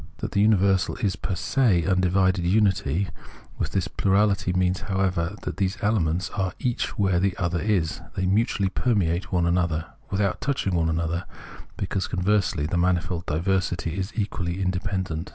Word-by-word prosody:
That - - -4
the 100 +1 +3
miiversal 95 -2 +2
is 100 -3 +1
fcr 95 - -3
se 115 -11 +2
in - - -4
undivided 95 -1 +2
unity 95 -3 +2 0.5
with - - -2
this 95 -3 0
plurality 100 0 +2
means, 90 0 +1
however, 95 -2 -1
that - - -4
these 95 0 0
elements 95 -4 +1
are 95 -2 -2
each 125 -2 -2
where 95 -3 +2
the 95 0 0
other 85 -2 0
is; 95 -7 0
they 95 - -1
m.utually 100 0 +1
permeate 95 -7 0
one 90 -2 +2
another 85 -2 +1
— - - -32
without 100 -1 0
touching 130 -9 -1
one 80 -2 +1
another, 85 +2 -1 0.5
because, 95 0 -2
conversely, 95 -4 +1
the 85 +3 -1
manifold 85 -1 0
diversity 90 0 0
is 95 +2 -3
equally 95 -4 -2
independent. 95 -3 -2
95 Hz, 160 wpm, -25 LUFS, 85-100 Hz, 0.5 s, the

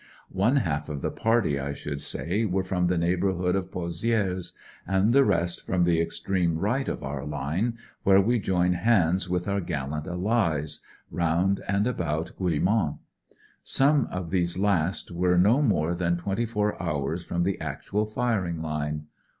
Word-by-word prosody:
One 100 +8 +2
half 75 - 0
the 75 -3 -3
party, 110 -11 +1
I 70 +1 -3
should 70 0 -5
say, 100 +7 -2
were 95 -3 0
from 90 -2 0
the 90 0 +1
neighbourhood 90 +1 +1
of 95 -1 -2
Pozi^res, 90 +1 -1 0.3
and 95 +4 +2
the 140 +1 +6
rest 85 -6 0
from 90 -1 +1
the 85 -1 +3
extreme 85 0 -1
right 120 +10 0
of - - -4
our 70 0 -4
line, 75 - -2 0.2
where 95 0 +5
we 120 +5 +2
join 90 -2 +1
hands 90 -3 +2
with 90 +1 -1
our 100 0 0
gallant 75 -2 -4
Allies, 90 -5 0 0.3
round 85 +3 +1
and 100 +1 +1
about 85 -9 -2
Guillemont. 90 -1 +1 0.6
Some 140 0 +4
of 90 -3 -5
these 90 -2 +1
last 95 -4 0
were 90 +1 +2
no 105 +10 +4
more 85 - +2
than 85 0 0
twenty 100 +6 -2
four 105 -3 -1
hours 80 0 -2
from 85 +1 -1
the 95 -1 -1
actual 90 +8 -2
firing 105 -7 -1
line. 75 -1 -3
90 Hz, 160 wpm, -26 LUFS, 80-100 Hz, 0.6 s, the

